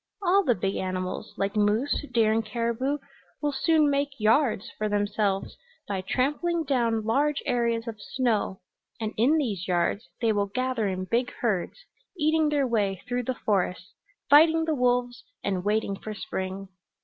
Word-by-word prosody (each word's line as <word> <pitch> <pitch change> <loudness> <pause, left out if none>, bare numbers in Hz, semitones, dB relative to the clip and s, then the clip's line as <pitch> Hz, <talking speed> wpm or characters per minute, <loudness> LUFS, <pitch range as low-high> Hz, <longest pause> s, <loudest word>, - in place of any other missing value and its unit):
All 390 +2 +4
the 245 -8 +2
big 195 +1 -2
animals, 185 0 -3
like 195 +1 -1
moose, 215 +8 +1
deer 225 -2 +3
and 225 0 +1
caribou, 235 +5 -1 0.4
will 295 -1 0
soon 305 +2 +3
make 280 0 +1
'yards' 225 0 +2
for 215 0 -2
themselves 205 -1 0 0.3
by 195 -2 -2
trampling 295 - 0
down 235 -6 0
large 285 +6 +1
areas 235 -1 0
of 220 -2 -6
snow, 225 -7 -1 0.4
and 220 -1 -3
in 265 +9 +3
these 210 - -2
yards 180 +4 0
they 230 -2 +2
will 205 -1 0
gather 250 +1 -1
in 185 -1 -2
big 240 +5 0
herds, 230 - -1 0.3
eating 310 0 +2
their 290 -2 +2
way 205 -6 0
through 245 -1 -2
the 255 - -1
forests, 190 -2 -1 0.3
fighting 320 +3 +6
the 320 - 0
wolves 245 -2 0 0.2
and 190 -2 -1
waiting 210 0 0
for 215 +2 -7
spring. 195 -2 -5
230 Hz, 160 wpm, -27 LUFS, 205-275 Hz, 0.4 s, fighting